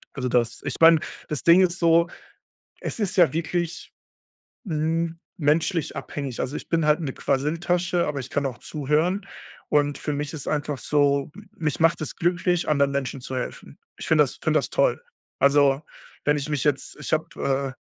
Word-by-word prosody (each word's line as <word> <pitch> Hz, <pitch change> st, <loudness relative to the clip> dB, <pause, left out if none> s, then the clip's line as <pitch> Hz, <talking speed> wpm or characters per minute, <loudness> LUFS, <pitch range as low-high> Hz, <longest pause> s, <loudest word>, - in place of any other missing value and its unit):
Also 125 Hz, -, -2 dB
das 120 Hz, -1 st, 0 dB
ich 145 Hz, -3 st, -3 dB
meine, 165 Hz, 0 st, +8 dB, 0.3 s
das 150 Hz, -, -3 dB
Ding 170 Hz, +2 st, +7 dB
ist 180 Hz, -1 st, +2 dB
so, 170 Hz, 0 st, +4 dB, 0.7 s
es -, -, -5 dB
ist 200 Hz, -3 st, -1 dB
ja 175 Hz, -4 st, +5 dB
wirklich, 170 Hz, +2 st, -3 dB, 0.7 s
hm, 165 Hz, 0 st, -1 dB, 0.2 s
menschlich 160 Hz, +2 st, +1 dB
abhängig. 140 Hz, -4 st, -5 dB
Also, 135 Hz, -, -3 dB
ich -, -, -9 dB
bin 165 Hz, -2 st, +1 dB
halt 150 Hz, +1 st, +3 dB
'ne 145 Hz, -6 st, -3 dB
Quasseltasche, 175 Hz, +5 st, 0 dB
aber 145 Hz, -2 st, -2 dB
ich 130 Hz, 0 st, -6 dB
kann 145 Hz, -, -1 dB
auch 130 Hz, -3 st, -3 dB
zuhören. 155 Hz, +7 st, 0 dB, 0.4 s
Und 145 Hz, -1 st, +2 dB
für 150 Hz, -, -3 dB
mich 145 Hz, +1 st, -3 dB
ist 150 Hz, -4 st, -6 dB
einfach 150 Hz, -1 st, -1 dB
so, 140 Hz, -1 st, +1 dB
m -, -, -13 dB
mich 150 Hz, -4 st, -2 dB
macht 165 Hz, 0 st, +3 dB
es 155 Hz, -, -4 dB
glücklich, 175 Hz, 0 st, 0 dB
anderen 140 Hz, -2 st, +3 dB
Menschen 135 Hz, -1 st, -3 dB
zu 130 Hz, +1 st, -5 dB
helfen. 125 Hz, -, -6 dB, 0.2 s
Ich -, -, -7 dB
finde -, -, +5 dB
das -, -, -5 dB
finde -, -, +3 dB
das -, -, -4 dB
toll. -, -, +1 dB, 0.4 s
Also, 140 Hz, 0 st, +4 dB, 0.4 s
wenn 150 Hz, 0 st, +3 dB
ich 145 Hz, +1 st, -4 dB
mich 145 Hz, -3 st, -1 dB
jetzt 145 Hz, -2 st, -1 dB
ich 150 Hz, -, -3 dB
habe, 140 Hz, -5 st, -1 dB
150 Hz, 180 wpm, -24 LUFS, 140-170 Hz, 0.7 s, meine